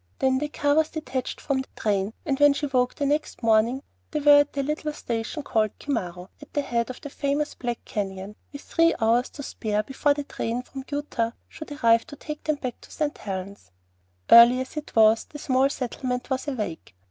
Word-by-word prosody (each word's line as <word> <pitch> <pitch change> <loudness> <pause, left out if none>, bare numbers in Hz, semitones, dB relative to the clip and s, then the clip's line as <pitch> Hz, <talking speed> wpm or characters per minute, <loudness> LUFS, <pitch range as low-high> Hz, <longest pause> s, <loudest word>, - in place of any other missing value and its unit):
Then 260 0 +2
the 300 - -1
car 290 -1 +1
was 315 +1 +3
detached 260 -5 -4
from 270 -2 -1
the 265 - -10
train; 200 0 0
and 275 -3 0
when 290 -1 +7
she 290 - -2
awoke 250 -2 0
next 285 -2 -1
morning 230 +4 +3 0.3
they 300 - -2
were 290 0 +7
at 290 0 +1
the 280 - -1
little 300 +1 -2
station 235 +4 -4
called 215 -5 0
Cimmaro, 180 -10 -4
at 290 - -13
the 290 - +1
head 235 -3 -1
of 255 - -7
the 285 - -8
famous 285 +1 -1
Black 240 -2 -5
Canyon, 195 0 -4 0.2
with 285 -1 -9
three 330 0 +3
hours 235 +2 +2
to 285 - -9
spare 215 -4 -2
before 285 +4 +1
the 290 - -3
train 245 -3 -3
from 265 0 -9
Utah 260 -6 -2
should 310 -2 -10
arrive 230 -5 +3
to 300 - -9
take 300 +1 -7
them 305 - +1
back 255 -4 -6
to - - -15
St. 300 -2 -2
Helen's. 190 - -6 0.6
Early 235 +2 +9
as 260 - -7
it 300 -1 -7
was, 220 0 +5
the 295 - -9
small 265 -1 +2
settlement 250 -1 -4
was 260 +2 -1
awake. 210 - -4
260 Hz, 205 wpm, -25 LUFS, 230-290 Hz, 0.6 s, Early